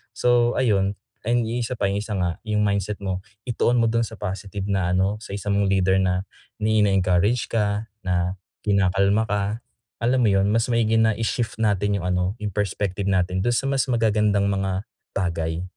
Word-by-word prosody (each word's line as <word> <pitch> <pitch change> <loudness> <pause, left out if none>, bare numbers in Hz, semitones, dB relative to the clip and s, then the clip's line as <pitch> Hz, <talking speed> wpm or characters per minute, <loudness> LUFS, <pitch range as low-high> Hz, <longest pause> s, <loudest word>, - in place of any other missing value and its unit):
So, 120 -1 +3
ayun, 100 -5 +2 0.3
ayun, 120 +1 +2
yung 120 +2 -2
1 125 - -3
pa, 100 - +1
yung 100 +1 -1
1 105 0 -5
nga, 90 -2 -1
yung 105 -1 +1
mindset 100 0 -1
mo 95 -2 -2 0.3
ituon 120 +1 +2
mo 115 - +3
dun 115 0 +1
sa - - -12
positive 100 0 -5
na 95 -2 +1
ano, 95 +3 +1
sa 100 - -8
1 100 0 -4
mong 100 0 +2
leader 95 0 +3
na 90 0 +1 0.4
na 105 - +1
ini-encourage 100 +1 +2
ka, 105 0 -1 0.2
na 90 +1 0 0.3
kinakalma 100 +1 +3
ka, 100 0 +1 0.6
alam 125 +2 +3
mo - - +4
yun, 95 0 +3
mas 115 +1 +2
maigi 115 -1 +2
na 110 -1 +3
i-shift 115 +1 -2
natin 100 -1 +1
yung 90 - -6
ano, 90 +1 0
yung 105 -1 -3
perspective 100 -1 -1
natin 95 -1 +1
dun 120 - +2
sa 135 - 0
mas 135 -1 +2
magagandang 105 -4 +2
mga 95 -1 -1 0.3
bagay. 85 -2 -1
100 Hz, 185 wpm, -23 LUFS, 95-110 Hz, 0.6 s, mo